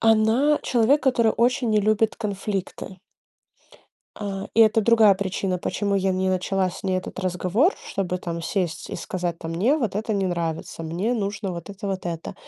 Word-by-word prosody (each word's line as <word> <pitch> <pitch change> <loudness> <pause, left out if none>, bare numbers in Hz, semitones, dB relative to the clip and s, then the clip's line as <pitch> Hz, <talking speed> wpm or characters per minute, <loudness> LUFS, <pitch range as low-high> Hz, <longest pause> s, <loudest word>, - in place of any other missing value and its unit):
она- 225 +7 +4
человек, 250 +5 +3
который 240 -5 +3
очень 245 +1 +2
не 215 -1 +3
любит 215 +1 +2
конфликты. 195 -3 -4 1.2
А, 195 -2 -4
и 230 - +4
это 220 0 +6
другая 220 -2 +5
причина, 190 -1 -2
почему 200 +3 -1
я 195 -1 +1
не 185 0 0
начала 185 0 0
с 175 - -10
ней 190 -1 0
этот 185 - -6
разговор, 185 - +1
чтобы 180 -2 -2
там 170 -2 -5
сесть 175 -1 -2
и - - -5
сказать 175 -2 -3
там: 165 - -6
"Мне 220 - +2
вот 230 -11 -2
это 215 +1 -1
не 195 -1 0
нравится, 165 -2 -3
мне 175 +9 -1
нужно 200 -3 -2
вот 170 +1 -7
это, 200 0 -7
вот 190 -2 -3
это". 170 +2 -5
195 Hz, 180 wpm, -24 LUFS, 185-220 Hz, 1.2 s, это